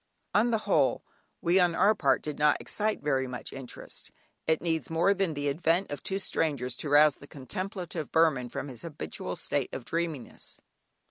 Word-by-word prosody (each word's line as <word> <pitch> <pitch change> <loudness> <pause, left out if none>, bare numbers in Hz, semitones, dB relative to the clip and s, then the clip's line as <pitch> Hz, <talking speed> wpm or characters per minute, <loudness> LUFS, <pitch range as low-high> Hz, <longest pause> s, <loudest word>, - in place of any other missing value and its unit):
On 225 +4 +4
the 230 - +2
whole, - - +2 0.4
we 175 +2 +4
on 175 -2 +3
our 200 +5 +5
part 140 -10 +2
did 150 -1 -5
not 150 0 +4
excite 215 -4 -2
very 135 -3 +1
much 125 -1 -5
interest. 135 -2 -7 0.4
It 160 -1 +3
needs 165 -2 -1
more 170 +5 +3
than 190 -5 0
the 145 0 -2
advent 165 +5 +1
of 145 - -4
two 195 - -2
strangers 140 -10 -1
to 150 - -4
rouse 145 0 +6
the 140 - -13
contemplative 175 +2 -5
Burman 155 -7 +3
from 130 - -4
his 125 -4 -7
habitual 160 -3 -5
state - - -1
of 125 - -6
dreaminess. 165 -3 -4
160 Hz, 180 wpm, -29 LUFS, 140-180 Hz, 0.4 s, rouse